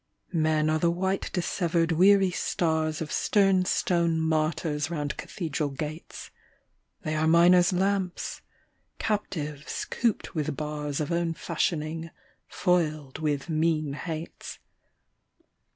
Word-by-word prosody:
Men 155 -2 +2
are 155 - +1
the 170 - +3
white 190 +3 -1
dissevered 170 -2 0
weary 190 +3 +5
stars 160 -2 0
Of 150 - -8
stern 195 -3 +3
stone 170 -3 +1
martyrs 155 -1 0
round 150 -4 -2
cathedral 155 -5 -3
gates; 150 +4 -7 0.7
They 155 -2 -2
are 155 +1 +1
miner's 175 +2 +6
lamps, 190 0 -1 0.6
captives 150 -9 -3
cooped 230 -5 -1
with 155 -4 -2
bars 150 -1 -3
Of 150 - -3
own 170 -1 0
fashioning, 160 0 -2 0.4
foiled 155 -6 0
with 150 -2 -1
mean 155 -2 +1
hates. 160 +2 -6
160 Hz, 110 wpm, -27 LUFS, 155-175 Hz, 0.7 s, miner's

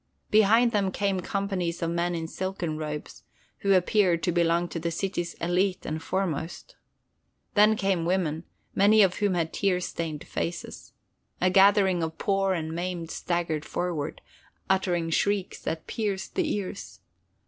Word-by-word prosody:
Behind 220 +3 +5
them 200 -3 +1
came 195 -1 0
companies 185 -3 -2
of 165 - 0
men 170 +1 0
in 165 -1 -3
silken 185 -3 -3
robes, 150 -1 -6 0.4
who 200 0 +3
appeared 180 -2 +3
to 175 - +2
belong 170 0 +2
to 165 - -4
the 170 +1 -2
city's 175 0 -3
élite 180 +2 0
and 155 +1 -3
foremost. 180 - -3 0.8
Then 210 +1 +5
came 195 -4 0
women, 170 -2 0 0.3
many 210 +2 +6
of 185 -2 +2
whom 205 -3 +1
had 165 -2 -1
tear 195 -3 +1
stained 165 -4 -4
faces. 170 - -5 0.5
A 185 0 +3
gathering 195 -2 +5
of 160 0 -3
poor 195 -1 +1
and 160 -1 -3
maimed 175 -1 -4
staggered 170 -3 -2
forward, 165 -5 -3 0.5
uttering 175 -3 +1
shrieks 200 +2 0
that 160 -1 -4
pierced 205 -4 -3
the - - 0
ears. 200 -1 -5
180 Hz, 150 wpm, -27 LUFS, 165-195 Hz, 0.8 s, many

